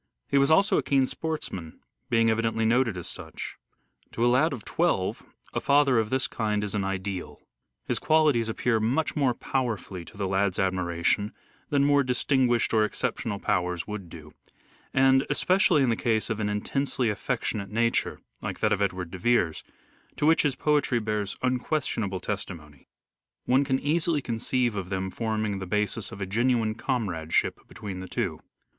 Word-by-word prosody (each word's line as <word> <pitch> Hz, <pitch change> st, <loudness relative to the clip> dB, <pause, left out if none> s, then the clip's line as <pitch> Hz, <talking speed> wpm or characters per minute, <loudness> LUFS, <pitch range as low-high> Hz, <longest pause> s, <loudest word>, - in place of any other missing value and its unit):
He 140 Hz, -, +3 dB
was 140 Hz, +1 st, +3 dB
also 195 Hz, +6 st, +4 dB
a -, -, +1 dB
keen 135 Hz, -2 st, +2 dB
sportsman, 130 Hz, -, -5 dB, 0.3 s
being 115 Hz, -1 st, +4 dB
evidently 115 Hz, 0 st, 0 dB
noted 115 Hz, -3 st, +2 dB
as 90 Hz, -, -5 dB
such. 80 Hz, -4 st, -6 dB, 0.6 s
To 115 Hz, -, +1 dB
a 120 Hz, -, +4 dB
lad 155 Hz, +6 st, +3 dB
of 125 Hz, -6 st, -6 dB
twelve -, -, 0 dB, 0.3 s
a -, -, -1 dB
father 140 Hz, -4 st, +4 dB
of 110 Hz, -1 st, -1 dB
this 130 Hz, +2 st, +1 dB
kind 105 Hz, -2 st, -1 dB
is 105 Hz, -, -3 dB
an 105 Hz, -2 st, 0 dB
ideal. 95 Hz, -1 st, -4 dB, 0.5 s
His -, -, -1 dB
qualities 150 Hz, -8 st, +3 dB
appeal 115 Hz, 0 st, +1 dB
much 125 Hz, +9 st, 0 dB
more 135 Hz, -5 st, +2 dB
powerfully 110 Hz, -10 st, -3 dB
to 80 Hz, -, -14 dB
the 100 Hz, -2 st, -1 dB
lad's 95 Hz, 0 st, +1 dB
admiration 90 Hz, +2 st, 0 dB, 0.4 s
than 140 Hz, -1 st, +3 dB
more 145 Hz, 0 st, +4 dB
distinguished 125 Hz, -2 st, +1 dB
or 110 Hz, -1 st, +4 dB
exceptional 105 Hz, 0 st, -2 dB
powers 90 Hz, -4 st, -1 dB
would 105 Hz, -5 st, -6 dB
do; 75 Hz, -2 st, -12 dB, 0.6 s
and, 135 Hz, 0 st, +4 dB
especially 175 Hz, 0 st, +3 dB
in 125 Hz, -, +2 dB
the -, -, +2 dB
case 110 Hz, -1 st, 0 dB
of 110 Hz, -, -2 dB
an 105 Hz, -1 st, 0 dB
intensely 125 Hz, +4 st, -1 dB
affectionate 100 Hz, 0 st, -2 dB
nature 115 Hz, +2 st, 0 dB, 0.2 s
like -, -, -4 dB
that 105 Hz, -, +2 dB
of 100 Hz, -, -1 dB
Edward 90 Hz, -3 st, -1 dB
de 95 Hz, -, -7 dB
Vere's, 90 Hz, -7 st, +1 dB, 0.5 s
to 145 Hz, -, -1 dB
which 160 Hz, +1 st, +5 dB
his 145 Hz, -4 st, 0 dB
poetry 145 Hz, -4 st, +2 dB
bears 105 Hz, -3 st, -2 dB
unquestionable 125 Hz, -6 st, -1 dB
testimony, 80 Hz, -7 st, -6 dB, 0.6 s
one 130 Hz, +3 st, +4 dB
can 135 Hz, -2 st, +1 dB
easily 155 Hz, +2 st, +1 dB
conceive 120 Hz, 0 st, 0 dB
of 95 Hz, -3 st, -4 dB
them 95 Hz, 0 st, -2 dB
forming 110 Hz, -3 st, -2 dB
the 95 Hz, -, -6 dB
basis 105 Hz, +1 st, -1 dB
of 100 Hz, -, -9 dB
a 95 Hz, -, -2 dB
genuine 115 Hz, +2 st, +1 dB
comradeship 100 Hz, -, -1 dB
between 100 Hz, -3 st, -7 dB
the 95 Hz, -, -7 dB
two. -, -, -2 dB
110 Hz, 170 wpm, -27 LUFS, 95-130 Hz, 0.6 s, which